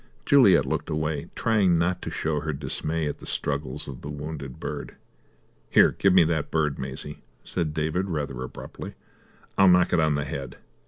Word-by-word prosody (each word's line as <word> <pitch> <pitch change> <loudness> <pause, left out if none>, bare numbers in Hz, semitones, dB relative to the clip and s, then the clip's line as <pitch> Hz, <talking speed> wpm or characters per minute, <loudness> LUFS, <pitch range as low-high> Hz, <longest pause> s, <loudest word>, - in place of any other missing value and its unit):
Juliet 135 - +6
looked - - -2
away, 75 -1 -2
trying 100 -6 +3
not 90 +2 0
to - - -4
show 80 -2 -1
her 75 +1 -3
dismay 75 +3 -2
at 75 - -4
the - - -10
struggles 70 -2 -2
of 65 -3 -8
the 75 - -7
wounded 75 -3 -6
bird. 75 0 -6 0.7
"Here, - - +6
give 100 - +2
me 90 -1 +7
that 80 -2 -1
bird, 75 -3 0
Maisie," 65 +2 -6 0.2
said 85 -4 -2
David 80 +5 -1
rather 70 -6 -3
abruptly. 65 - -8 0.6
"I'll 95 - +7
knock 90 0 +5
it 90 - +4
on 80 -2 +3
the 70 -1 -1
head." 70 -2 -6
75 Hz, 175 wpm, -26 LUFS, 70-85 Hz, 0.7 s, me